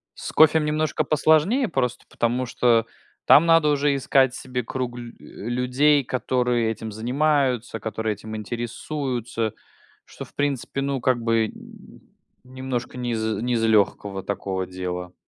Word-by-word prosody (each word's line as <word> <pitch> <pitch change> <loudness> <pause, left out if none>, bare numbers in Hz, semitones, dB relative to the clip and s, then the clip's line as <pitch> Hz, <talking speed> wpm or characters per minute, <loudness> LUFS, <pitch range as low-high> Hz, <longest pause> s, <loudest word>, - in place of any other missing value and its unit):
С - - -6
кофем 155 0 +5
немножко 155 0 0
посложнее 160 - +3
просто 125 -6 -2
потому, 120 +2 -1
что 120 -2 +2 0.4
там 155 - +7
надо 165 -2 +5
уже 145 -1 +2
искать 135 -1 +3
себе 125 -2 -4
круг 125 +1 -4
лю 120 -1 -8
э, 115 - -9
людей, 130 +4 +2
которые 125 -2 0
этим 110 0 -6
занимаются, 125 0 0
которые 110 +1 -2
этим 110 +2 -8
интересуются, 120 0 -3 0.5
что, - - -9
в - - -22
принципе, 140 -1 -2
ну, 140 -1 -1
как 120 -1 +1
бы, 115 -1 +2
м, - - -14 0.4
немножко 130 -1 -5
не 125 -1 -3
из 110 -1 -1 0.2
не 125 +1 -1
из 115 -1 +1
легкого 100 -3 +1
такого 95 -2 -3
дела. 90 -1 -5
125 Hz, 145 wpm, -23 LUFS, 115-140 Hz, 0.5 s, там